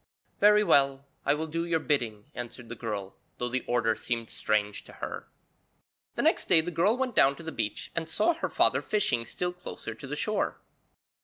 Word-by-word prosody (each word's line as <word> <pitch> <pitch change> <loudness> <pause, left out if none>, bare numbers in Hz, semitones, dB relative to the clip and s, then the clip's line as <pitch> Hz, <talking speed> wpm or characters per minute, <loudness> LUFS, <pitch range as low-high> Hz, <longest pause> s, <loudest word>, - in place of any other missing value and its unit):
'Very 210 +1 +6
well, 140 -6 +3 0.2
I 145 - +5
will 155 +2 -2
do 165 +1 -2
your 170 -1 +1
bidding,' 120 -9 -1
answered 120 -1 -7
the 115 - -5
girl, 105 -4 -5 0.2
though 120 - -1
the 130 0 -1
order 115 -2 +2
seemed 115 -1 -3
strange 105 -1 0
to - - -13
her. - - -6 0.9
The - - 0
next - - +2
day - - +7
the 170 +2 -1
girl 180 +8 +2
went 255 -3 -1
down 140 +1 +5
to 170 - -11
the 160 - -5
beach 105 -6 -3
and 165 -1 -3
saw 345 - +3
her 330 - -3
father - - +3
fishing 205 - +1
still 180 +7 -2
closer 180 -9 -7
to 115 +5 -10
the 145 - -3
shore. 215 +8 -1
140 Hz, 200 wpm, -29 LUFS, 115-170 Hz, 0.9 s, day